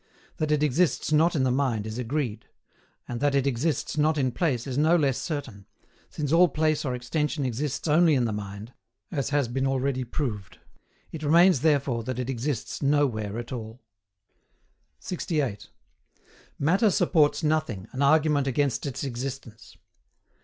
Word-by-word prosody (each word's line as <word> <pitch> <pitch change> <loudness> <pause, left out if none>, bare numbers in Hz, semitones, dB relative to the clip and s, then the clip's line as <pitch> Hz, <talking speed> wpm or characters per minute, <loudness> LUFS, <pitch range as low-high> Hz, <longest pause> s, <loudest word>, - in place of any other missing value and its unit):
That 155 -1 -1
it 150 0 +2
exists 155 +2 +1
not 160 +3 +3
in 135 - +2
the 130 - +2
mind 125 -5 0
is 110 +2 -5
agreed; 125 -3 -3 0.6
and 120 -1 -4
that 145 +1 +1
it 140 -1 +2
exists 140 +4 -1
not 155 +1 +2
in 130 -3 +1
place 125 -4 -1
is 130 -3 -4
no 155 +4 +4
less 140 -6 +1
certain 135 - -5 0.4
since 150 -2 -4
all 175 +2 +6
place 155 0 0
or 130 -4 -2
extension 150 +4 -2
exists 135 +4 -3
only 160 +1 +4
in 125 -3 +2
the 110 - -1
mind, 105 +3 -7 0.4
as 140 -6 -2
has 145 -3 +1
been 130 +3 -1
already 135 0 0
proved. 110 - -4 0.5
It 160 - -7
remains 170 +1 +5
therefore 140 -6 +1
that 130 -1 -3
it 125 +1 -2
exists 130 0 -3
nowhere 130 -8 +1
at 120 +2 -6
all. 115 -1 -6 1.2
68. 145 - -3 0.9
MATTER 185 +9 +3
SUPPORTS 160 -4 +2
NOTHING, 150 -11 -1
AN 130 - -4
ARGUMENT 145 -1 +3
AGAINST 140 +1 0
ITS 135 0 -5
EXISTENCE. 125 -3 -6
140 Hz, 155 wpm, -26 LUFS, 120-150 Hz, 1.2 s, all